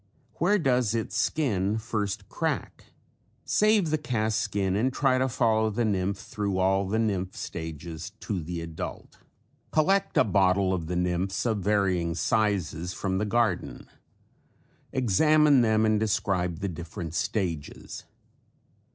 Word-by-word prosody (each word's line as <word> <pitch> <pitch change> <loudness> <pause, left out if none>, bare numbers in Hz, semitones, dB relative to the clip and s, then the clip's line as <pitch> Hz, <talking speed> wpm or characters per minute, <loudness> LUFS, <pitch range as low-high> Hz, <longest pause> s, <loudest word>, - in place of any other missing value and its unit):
Where 200 +6 +3
does 125 - +1
its 105 -3 -3
skin 110 -6 0
first 105 -3 -3
crack? - - -3 0.6
Save 210 -6 +3
the 155 - +1
cast 110 -6 0
skin 100 -3 -1
and 120 +6 +1
try 130 -1 +2
to 130 +1 +1
follow 110 -2 +2
the 115 +3 -1
nymph 100 -1 0
thru 100 0 -3
all 95 +1 +2
the 105 +3 0
nymph 100 -5 -1
stages 80 +1 -6
to 100 -5 -3
the 85 +2 -5
adult. 80 -1 -7 0.5
Collect 190 +6 +2
a - - +7
bottle 95 -2 +2
of 85 -4 -3
the 90 - -2
nymphs 90 +3 -1
of 110 -3 +1
varying 95 -4 +1
sizes 90 -6 0
from 95 -1 -2
the 105 - 0
garden. 110 -3 0 1.1
Examine 140 +4 +4
them 110 -1 +3
and 110 -1 +2
describe 95 -5 0
the 100 - -1
different 85 -2 -6
stages. 85 -5 -3
100 Hz, 135 wpm, -27 LUFS, 90-115 Hz, 1.1 s, a